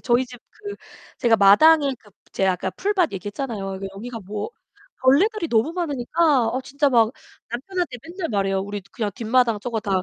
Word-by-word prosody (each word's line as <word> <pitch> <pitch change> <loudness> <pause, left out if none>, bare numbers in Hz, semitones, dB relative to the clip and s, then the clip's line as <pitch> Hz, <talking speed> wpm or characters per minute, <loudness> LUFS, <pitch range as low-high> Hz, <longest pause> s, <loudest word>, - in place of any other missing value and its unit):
저희 245 +1 +2
집 245 -1 -12 0.2
그 410 -1 -7 0.4
제가 230 -3 +4
마당에 280 +9 +6
그 210 - -21 0.2
제가 190 -1 +2
아까 185 +1 -3
풀밭 385 - 0
얘기했잖아요. 200 -1 -5
그 195 - -4
여기가 230 +2 -7
뭐 205 +2 -4 0.5
벌레들이 335 +9 +3
너무 230 +6 +2
많으니까 295 -4 +1
어 255 - -1
진짜 280 +2 +1
막 230 -4 +4 0.4
남편한테 310 +3 -3
맨날 345 +1 -5
말해요. 195 -2 0
"우리 205 +1 -5
그냥 215 -3 -2
뒷마당 230 -1 +2
저거 230 -1 -3
다 195 -3 0
240 Hz, 360 characters per minute, -23 LUFS, 205-300 Hz, 0.5 s, 마당에